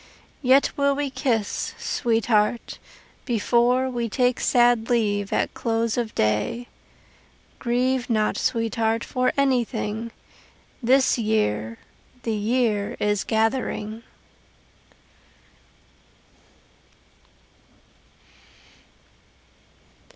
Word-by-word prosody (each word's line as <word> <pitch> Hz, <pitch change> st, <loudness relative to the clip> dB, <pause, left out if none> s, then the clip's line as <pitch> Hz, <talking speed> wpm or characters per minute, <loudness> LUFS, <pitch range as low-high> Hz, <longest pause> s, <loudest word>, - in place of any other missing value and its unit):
Yet 270 Hz, +1 st, +4 dB
will 280 Hz, 0 st, +2 dB
we 285 Hz, -1 st, -2 dB
kiss, 245 Hz, -5 st, -1 dB
sweetheart, 225 Hz, -1 st, 0 dB, 0.4 s
before 240 Hz, +2 st, +2 dB
We 240 Hz, -2 st, -3 dB
take 250 Hz, +2 st, +1 dB
sad 240 Hz, -2 st, +3 dB
leave 205 Hz, -4 st, 0 dB
at -, -, 0 dB
close 230 Hz, -1 st, -1 dB
of 235 Hz, -3 st, -3 dB
day. 110 Hz, -, 0 dB, 0.9 s
Grieve 250 Hz, +1 st, 0 dB
not, 215 Hz, -2 st, +1 dB
sweetheart, 225 Hz, 0 st, 0 dB
for 255 Hz, 0 st, 0 dB
anything 235 Hz, -4 st, 0 dB, 0.7 s
The 260 Hz, +3 st, +4 dB
year, 115 Hz, -, 0 dB, 0.5 s
the 225 Hz, -, -1 dB
year 215 Hz, -1 st, 0 dB
is 210 Hz, -1 st, 0 dB
gathering. 220 Hz, -1 st, -1 dB
230 Hz, 75 wpm, -24 LUFS, 215-250 Hz, 0.9 s, Yet